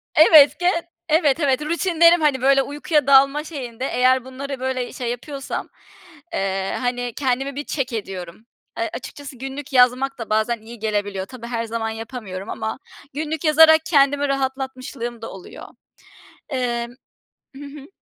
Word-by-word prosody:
Evet, 310 0 +7
gen 350 -1 +2 0.3
Evet, 310 -2 +3
evet. 275 -3 +1
Rutinlerim, 335 +1 +3
hani, 285 -4 +2
böyle, 270 +1 +4
uykuya 295 +1 -1
dalma 275 +2 +5
şeyinde 260 -6 -6
eğer 255 +1 +2
bunları, 270 +1 -6
böyle, 260 -1 -3
şey, 245 -2 -4
yapıyorsam, 275 +3 -6 0.6
eee, 195 - -2
hani, 245 -1 -2
kendimi 270 0 -1
bir 290 +1 -5
check 265 -5 -3
ediyorum. 190 -2 -6 0.3
Eee, - - -1
açıkçası 280 -3 -8
günlük 270 +2 -7
yazmak 255 +2 +3
da 230 - -6
bazen 220 +2 0
iyi 230 +1 -11
gelebiliyor. 205 -3 -2
Tabii 235 +1 -10
her 230 -1 -3
zaman 225 0 -3
yapamıyorum 220 -4 -7
ama 220 - -4 0.3
günlük 310 +2 -4
yazarak 315 +1 +6
kendimi 285 -2 +3
rahatlatmışlığım 265 -3 -4
da 225 - -7
oluyor. 190 - -11 0.8
Emm 240 -3 -2 0.6
Hı 280 - -9
hı. 280 0 -11
260 Hz, 145 wpm, -21 LUFS, 235-285 Hz, 0.8 s, Evet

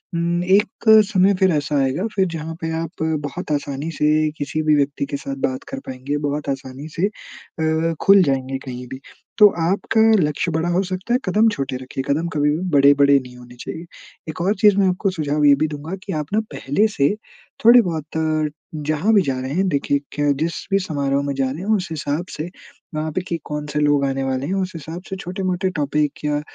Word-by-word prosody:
उम, 170 +1 0
एक 200 +4 +2 0.2
समय 195 -1 +4
फिर 190 -1 +4
ऐसा 145 -1 0
आएगा 135 +9 -1
फिर 190 -2 +3
जहाँ 160 0 -5
पे 160 0 -2
आप 165 0 -5 0.2
बहुत 155 +4 -5
आसानी 145 +1 -2
से 155 +1 +3
किसी 145 +2 -2
भी 155 -1 +4
व्यक्ति 140 -1 0
के 140 0 -4
साथ 135 0 -5
बात 130 0 -5
कर 270 -1 -5
पाएँगे, 130 +3 -3
बहुत 145 0 -3
आसानी 135 +2 -5
से 185 +4 +2
अ, 160 -5 -3
खुल 195 0 +7
जाएँगे 135 -3 -1
कहीं-भी। 125 0 -7 0.4
तो 210 - +9 0.2
आपका 210 +3 +1 0.2
लक्ष्य 150 +3 -1
बड़ा 160 +2 0
हो 175 +2 +2
सकता 185 +5 -3
है 250 - +3
कदम 210 +4 +3
छोटे 135 -8 -3
रखिए। 130 +1 -5
कदम 155 +4 0
कभी 150 0 +2
भी - - -3
बड़े-बड़े 140 0 +5
नहीं 125 -1 -12
होने 125 0 -13
चाहिए। 165 +6 -7 0.4
एक 155 - -5
और 195 +4 +1
चीज़ 205 -2 +6
मैं 195 -1 +4
आपको 185 +2 0
सुझाव 150 -4 0
ये 145 -1 +7
भी 155 +3 0
दूँगा 150 +4 -6
की 195 - -5
आप 150 -2 -3
ना, 215 - +3
पहले 195 +12 +1
से 140 +8 +3 0.5
थोड़े 240 +1 +9
बहुत 165 -7 -3 0.8
जहाँ 155 +9 +2
भी 205 - +6
जा 135 -4 -2
रहे 130 +2 -4
हैं, 190 +4 +1
देखिए 140 -2 +1
कि 145 -1 +1
जिस 165 +2 0 0.2
भी 195 - +4
समारोह 140 -6 -1
में 140 - -1
जा 135 -1 0
रहे 150 +6 -6
हैं 215 +3 +2
उस 190 -3 -2
हिसाब 150 +2 -2
से 155 +3 -5 0.5
वहाँ 155 +1 -2
पे 185 - -2
कि 170 - -2
कौन-से 150 0 -3
लोग 145 -1 +3
आने 135 0 -1
वाले 135 0 -2
हैं 185 - -2
उस 185 -1 -1
हिसाब 165 +2 -7
से 190 - -3
छोटे-मोटे 185 0 -2
टॉपिक 150 0 -1
या 145 0 0
155 Hz, 210 wpm, -21 LUFS, 140-185 Hz, 0.8 s, तो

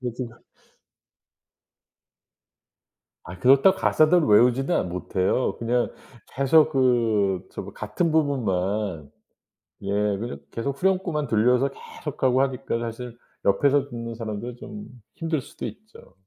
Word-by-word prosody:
그게 125 -2 -3
진짜 120 -1 -7 2.9
아 90 +2 -10
그렇다고 135 - +5
가사도 155 +3 +4
외우지도 125 +8 +4
않 - - -1
못해요. 90 +6 -1
그냥 120 +1 0 0.4
계속 150 +4 +4
그 115 -8 +2
저 - - -5
뭐 - - -10
같은 110 +11 -2
부분만 100 - -1 0.7
예 100 - -4 0.3
그냥 115 +4 -5
계속 135 +4 -3
후렴구만 185 -6 0
들려서 125 +4 +3
계속하고 130 -2 -2
하니까 130 -3 -1
사실 120 +1 -6 0.3
옆에서 140 +8 +3
듣는 115 -2 -6
사람들은 115 +2 -6
좀 205 +7 -9 0.3
힘들 165 -2 -1
수도 - - -9
있죠. 215 - -11
125 Hz, 255 characters per minute, -24 LUFS, 110-140 Hz, 2.9 s, 그렇다고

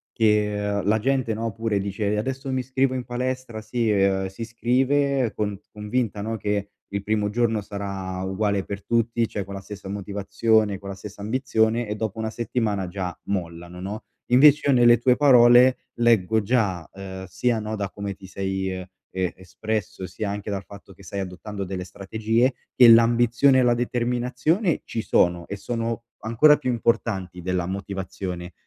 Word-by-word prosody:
che, 105 -2 +1
uhm, - - -9
la 110 - +4
gente, 130 -1 0
no, 115 +1 -3
pure 110 0 -1
dice: 100 +1 -1
"Adesso 135 +4 -3
mi 130 - 0
iscrivo 130 +1 0
in 125 - -3
palestra." 125 -2 -4
Si 115 +1 -1
uhm, 95 -1 +2
si 95 +4 -11
iscrive 130 +2 +1
con 105 -2 -2
convinta, 105 0 -2
no, 110 +1 -3
che 105 0 -2 0.2
il 100 0 -4
primo 105 -1 0
giorno 115 0 +1
sarà 100 -2 -5
uguale 100 +1 0
per 100 0 -7
tutti, 115 -1 +1
cioè 100 - -4
con 100 +1 -9
la - - -5
stessa 100 -1 -9
motivazione, 100 +1 0
con 100 - -10
la 100 - -5
stessa 100 +1 -10
ambizione 115 -1 +1
e 105 - -2
dopo 110 0 -4
una 110 0 -2
settimana 110 -4 -2
già 90 -1 -5
mollano, 85 -2 -5
no, 105 +4 -5 0.2
invece 145 +4 +6
io - - +6
nelle 120 -1 +6
tue 125 0 +3
parole 125 -2 +6
leggo 110 -3 +3
già, 100 -7 0
uhm, 95 -1 -8
sia, 110 +6 0
no, 110 +1 -4
da 100 -2 -3
come 100 -1 -5
ti 95 -1 -13
sei, 95 -1 -3
uhm, 90 - -7 0.3
e 90 -3 0
espresso 105 +1 -4
sia 100 +4 -4
anche 105 +1 -5
dal 100 -1 -3
fatto 100 -1 -13
che - - -18
sai 100 0 -5
adottando 100 +2 -6
delle 90 0 -4
strategie, 110 +7 0 0.2
che 125 - +8
l'ambizione 120 +3 +5
e - - +5
la 120 -1 +4
determinazione 125 - 0
ci 115 - -3
sono 85 -4 +2
e 100 - -4
sono 115 +2 -3 0.2
ancora 130 +7 +5
più - - -3
importanti 110 -6 -1
della 90 0 -1
motivazione. 95 -2 -5
105 Hz, 175 wpm, -24 LUFS, 100-120 Hz, 0.3 s, che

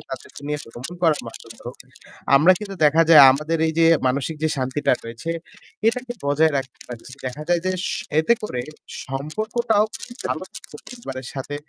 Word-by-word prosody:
তাদেরকে - - -9
নিয়ে 150 0 -1
ভ্রমন 125 +9 -8
করার 160 -3 +3
মাধ্যমে - - -11
হোক - - -7 0.6
আমরা 160 +7 +7
কিন্তু 200 -2 -7
দেখা 155 +2 +5
যায় 150 -4 +10
আমাদের 150 +4 -1
এই 160 - 0
যে 165 - +6 0.2
মানসিক 140 +4 -1
যে 160 - +2
শান্তিটা 130 +2 0
রয়েছে 115 +8 -6 0.6
এটাকে 245 +1 0
বজায় 150 +3 +3
রাখতে 130 -2 -5
পারছি। 120 +1 -10
দেখা 135 +4 -5
যায় 175 - +3
যে 185 - +1 0.5
এতে 160 +9 +4
করে 125 -12 -3 0.4
সম্পর্কটাও 215 - 0 0.4
ভালো - - -3
থাকছে - - -12
পরিবারের 135 - -8
সাথে। 140 +1 -5
150 Hz, 160 wpm, -22 LUFS, 135-175 Hz, 0.6 s, যায়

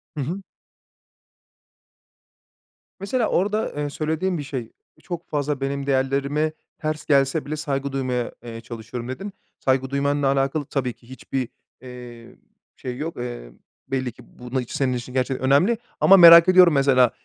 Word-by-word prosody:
Hı 150 - -3
hı. 175 +8 -4 2.6
Mesela 225 +4 0
orada, 210 +4 0
eee, 145 0 -2
söylediğin 160 +5 -2
bir 145 - -4
şey, 130 -5 -6 0.3
çok 175 -1 -7
fazla 145 -1 -2
benim 140 0 -2
değerlerime 140 +3 0 0.3
ters 155 0 -4
gelse 140 +1 +2
bile 150 - -3
saygı 140 -2 -3
duymaya, 130 -3 -2
eee, 115 -1 -8
çalışıyorum 115 +1 -7
dedin. 195 +10 -6 0.3
Saygı 130 0 +1
duymanla 140 +1 0
alakalı 135 +2 0
tabii 125 -3 -2
ki 120 - -23
hiçbir, 130 -1 -4 0.3
eee, 125 -2 -11 0.4
şey 125 -1 -6
yok. 160 +3 -5
Eee, 120 - -6 0.4
belli 130 -2 -2
ki 125 +1 -17
bu 125 +1 -13
na 130 - +2
iç 120 - -10
senin 130 -2 0
için 125 0 -6
gerçekten 130 0 -1
önemli 180 - +4 0.2
ama 195 - +7
merak 170 0 +10
ediyorum 180 -3 +7
mesela 130 -3 +4
135 Hz, 150 wpm, -23 LUFS, 125-155 Hz, 2.6 s, merak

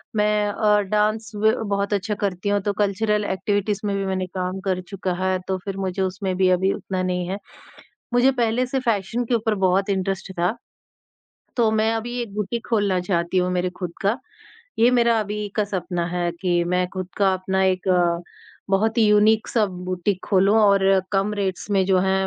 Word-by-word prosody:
मैं 210 0 +2
अ, 210 0 +2
डांस 215 +2 0
ब 215 +1 +3 0.2
बहुत 200 0 0
अच्छा 205 +1 -1
करती 195 0 -1
हूँ 205 0 +2
तो 205 +1 -1
कल्चरल 210 +1 0
एक्टिविटीज़ 200 +1 -1
में 200 -1 0
भी 195 0 -1
मैंने 190 -1 -1
काम 185 +1 -2
कर 185 -1 0
चुका 190 -2 -3
है 190 0 +1
तो 190 - 0
फिर 195 -1 -4
मुझे 190 0 -2
उसमें 190 0 -2
भी 185 -1 +3
अभी 185 +1 +2
उतना 185 -1 -4
नहीं 180 -1 -1
है। 195 - -2 0.8
मुझे 245 +2 +5
पहले 245 0 +1
से 265 +1 -1
फैशन 230 0 -1
के 240 - -1
ऊपर 225 -1 +1
बहुत 195 +2 +1
इंटरेस्ट 190 0 -2
था, 180 +7 +1 1.0
तो 230 -3 +3
मैं 220 +1 +2
अभी 240 +2 -3
एक 210 -4 -8
बुटीक 210 +3 -3
खोलना 205 -5 +1
चाहती 175 0 0
हूँ 180 0 +1
मेरे 180 0 0
ख़ुद 180 -3 -4
का, 205 +5 +1 0.6
ये 235 +2 +5
मेरा 235 -2 +3
अभी 210 0 -3
का 210 - +2
सपना 180 -3 -3
है 175 0 -1
कि 175 -2 +1
मैं 180 +1 +1
ख़ुद 185 -1 -4
का 195 -2 +3
अपना 190 +1 -1
एक 185 0 0 0.8
बहुत 215 +4 +2
ही 220 - +5
यूनिक 210 +1 +4
सा 225 -3 +2
बुटीक 185 +1 -3
खोलूँ 195 +2 +3
और 195 -2 +4
कम 195 +1 +1
रेट्स 195 -1 -3
में 195 -2 +3
जो 190 -1 +3
हैं 190 0 +1
195 Hz, 190 wpm, -23 LUFS, 185-210 Hz, 1.0 s, मुझे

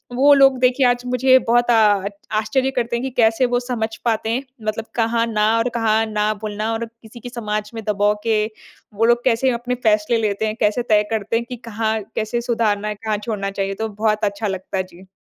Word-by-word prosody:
वो 285 +3 +6
लोग 270 -1 +5
देखिए 255 +1 +3
आज 245 0 +1
मुझे 255 +1 +4
बहुत 240 +1 +3
आ - - +5 0.3
आच् 200 - -4 0.3
आश्चर्य 260 +5 0
करते 235 -2 -1
हैं 235 - -3
कि 265 - -2
कैसे 225 +2 +3
वो 245 0 +1
समझ 225 -3 -3
पाते 225 -1 0
हैं? 245 +4 -1 0.2
मतलब 215 +1 -3
कहाँ 230 0 +1
ना 215 -2 +1
और 230 +2 +1
कहाँ 225 -1 +2
ना 215 0 0
बोलना 215 +1 -3
और 230 +1 -2
किसी 230 0 -15
की 245 - -8
समाज 215 -3 -4
में 225 -1 -6
दबाव 205 0 +2
के 215 -2 +2 0.5
वो 220 +3 +1
लोग 240 +1 +3
कैसे 255 +1 +2
अपने 245 +1 -2
फ़ैसले 215 +2 +2
लेते 210 0 -1
हैं, 215 - -3
कैसे 210 +3 +2
तय 210 -3 +3
करते 220 0 -1
हैं 235 - -3
कि 250 - -4
कहाँ, 220 -1 -2 0.2
कैसे 225 +2 -1
सुधारना 220 -3 0
है, 210 - -3
कहाँ 215 0 -2
छोड़ना 200 -4 -3
चाहिए, 195 0 -2
तो 220 +2 -4
बहुत 215 +1 -1
अच्छा 205 +1 -2
लगता। 190 0 -3
जी। 185 0 -13
225 Hz, 215 wpm, -20 LUFS, 210-240 Hz, 0.5 s, वो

